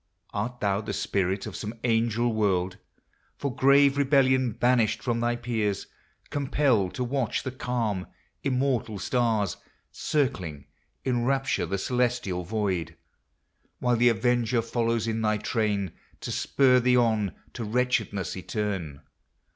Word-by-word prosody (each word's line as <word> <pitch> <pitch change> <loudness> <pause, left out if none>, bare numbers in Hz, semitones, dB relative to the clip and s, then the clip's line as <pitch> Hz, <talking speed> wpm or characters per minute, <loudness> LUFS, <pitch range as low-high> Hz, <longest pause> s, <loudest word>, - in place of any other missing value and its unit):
Art 120 +4 -3
thou 100 0 +1
the 105 -1 -5
Spirit 95 0 -1
of - - -6
some 110 +1 -5
Angel 115 0 +1
World, 95 -3 +1 0.6
For 140 -3 -3
grave 140 +1 +5
rebellion 130 -3 +3
banished 120 -1 +2
from 120 -2 0
thy 120 +1 +1
peers, 110 -4 -1 0.5
Compelled 135 -8 +1
to 125 - -1
watch 125 -2 -1
the 130 - -3
calm, 115 -7 -2 0.4
immortal 130 -5 0
stars 110 -3 0
MYTHICAL: - - -34
LEGENDARY. 130 - 0
89 75 -2 -11
Circling - - -31 0.4
in 120 -2 +1
rapture 135 -6 +1
the 100 +3 -1
celestial 120 -5 0
void, 90 -5 -2 0.8
While 125 -1 +1
the 120 +1 +5
avenger 120 +1 +1
follows 115 -1 0
in 115 0 -1
thy 110 -1 +2
train 105 -4 -1 0.3
To - - -4
spur 130 -2 +3
thee 125 0 +3
on 110 -5 +2 0.2
to 120 - -5
wretchedness 110 -4 0
eterne 95 -7 -3
115 Hz, 140 wpm, -27 LUFS, 100-125 Hz, 0.8 s, grave